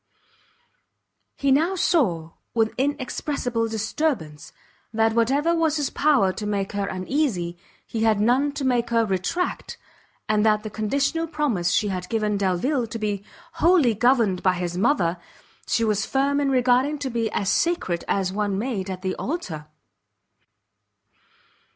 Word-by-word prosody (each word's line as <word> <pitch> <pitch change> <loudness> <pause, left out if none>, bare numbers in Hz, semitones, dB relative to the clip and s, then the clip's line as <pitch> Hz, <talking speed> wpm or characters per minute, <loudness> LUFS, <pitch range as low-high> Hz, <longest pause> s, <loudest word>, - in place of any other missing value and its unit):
He 280 -1 +1
now 325 +8 +3
saw, 190 - +1 0.2
with 225 -1 +2
inexpressible 255 -3 -1
disturbance, 220 - -2 0.4
that 225 0 +2
whatever 275 +8 +2
was 320 -2 +1
his 290 -2 -1
power 270 -11 +3
to 210 - -5
make 200 -2 -1
her 200 -1 -2
uneasy, 185 - -1 0.3
he 225 - -4
had 220 -2 +3
none 255 +7 +2
to 285 -2 -3
make 245 -2 +1
her 230 -1 +2
retract, 195 - -2 0.5
and 215 -1 +2
that 210 -1 +3
the 215 - -6
conditional 280 +10 -1
promise 280 - 0
she 205 +3 +1
had 180 -2 -4
given 215 -2 0
Delvile 200 +7 0
to 230 - -5
be 205 -2 -2 0.4
wholly 330 -8 +5
governed 225 -5 +2
by 185 - +3
his 175 -1 -3
mother, 180 - +1 0.5
she 230 - +1
was 210 -2 +1
firm 275 +4 +1
in 280 -1 +1
regarding 255 +3 +2
to 275 -2 -4
be 230 -1 -1
as 200 - 0
sacred 335 - 0
as 190 -2 0
one 205 -1 -1
made 205 -4 -3
at 185 0 -6
the 185 - -1
altar. 180 - -4
225 Hz, 145 wpm, -24 LUFS, 195-280 Hz, 0.5 s, wholly